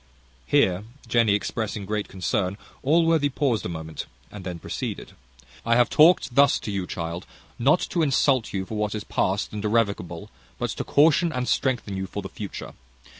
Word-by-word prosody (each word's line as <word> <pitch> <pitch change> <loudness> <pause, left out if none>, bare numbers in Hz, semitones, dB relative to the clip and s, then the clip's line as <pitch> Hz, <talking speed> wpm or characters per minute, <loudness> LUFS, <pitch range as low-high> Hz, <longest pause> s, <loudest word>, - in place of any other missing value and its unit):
Here 90 +9 +3 0.2
Jenny 115 -4 +3
expressing 105 0 -3
great 105 +1 -2
concern, 95 0 -1 0.2
Allworthy 160 0 +3
paused 130 - 0
a - - -6
moment, 80 -2 -6 0.2
and 105 -2 -9
then 90 -2 -5
proceeded: - - -5 0.5
"I 115 0 +2
have 120 0 +3
talked 155 -4 +5
thus 140 +2 +5
to 105 - -4
you, 95 -2 -2
child, 85 +1 -5 0.3
not 140 +8 +4
to 170 - +1
insult 135 -4 +2
you 95 -1 -2
for 110 - -6
what 105 0 -1
is 105 - -4
past 95 +2 -1
and 105 -1 -4
irrevocable, 105 -4 -1 0.3
but - - -2
to - - -4
caution 160 +3 +4
and 125 -2 -2
strengthen 120 -7 0
you 95 0 -3
for 100 +1 -5
the - - -6
future. 105 -2 -7
105 Hz, 175 wpm, -25 LUFS, 95-130 Hz, 0.5 s, talked